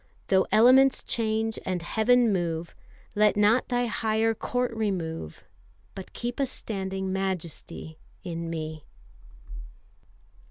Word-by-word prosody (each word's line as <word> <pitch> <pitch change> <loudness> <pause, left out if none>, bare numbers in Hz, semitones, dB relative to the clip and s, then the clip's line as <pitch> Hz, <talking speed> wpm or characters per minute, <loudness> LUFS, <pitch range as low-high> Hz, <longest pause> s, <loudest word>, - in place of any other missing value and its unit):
Though 190 -1 +3
elements 255 +4 +6
change 220 -1 -1
and 180 -2 -2
Heaven 230 +4 +3
move, 170 -2 -2 0.4
Let 210 0 +3
not 210 +4 +4
Thy 245 -1 0
higher 225 -1 +1
court 245 +2 -2
remove, 170 - -3 0.5
But 190 - -9
keep 240 +2 -4
a 275 - +2
standing 190 -4 -3
Majesty 180 -4 -4 0.2
in 170 -2 -4
me. 155 -2 -5
205 Hz, 110 wpm, -27 LUFS, 175-225 Hz, 0.5 s, elements